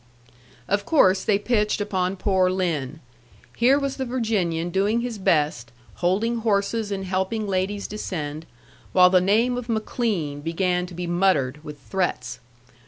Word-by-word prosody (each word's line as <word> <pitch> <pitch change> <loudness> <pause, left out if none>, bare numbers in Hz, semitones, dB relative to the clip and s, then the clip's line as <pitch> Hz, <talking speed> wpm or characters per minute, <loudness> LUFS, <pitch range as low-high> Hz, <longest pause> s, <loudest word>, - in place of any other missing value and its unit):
Of 200 0 0
course 190 -9 +4
they 210 -2 +2
pitched 210 0 0
upon 190 -2 -1
poor 190 -1 +2
Lin. 160 -6 -2 0.5
Here 255 +4 +4
was 275 -1 -2
the 265 - -2
Virginian 205 -9 -1
doing 205 +5 +1
his 235 -3 -4
best, 145 -10 +1 0.3
holding 205 +7 +1
horses 215 -1 0
and 195 -1 -3
helping 190 +4 -1
ladies 195 +1 -1
descend, 160 -7 -5 0.5
while 180 -1 +6
the 185 -1 +5
name 225 +6 +2
of 245 -1 -6
McLean 215 - -2
began 180 +3 -1
to 180 - -11
be 175 +1 -4
muttered 170 -6 +1
with 150 -1 -9
threats. 175 -5 -3
190 Hz, 145 wpm, -24 LUFS, 175-215 Hz, 0.5 s, while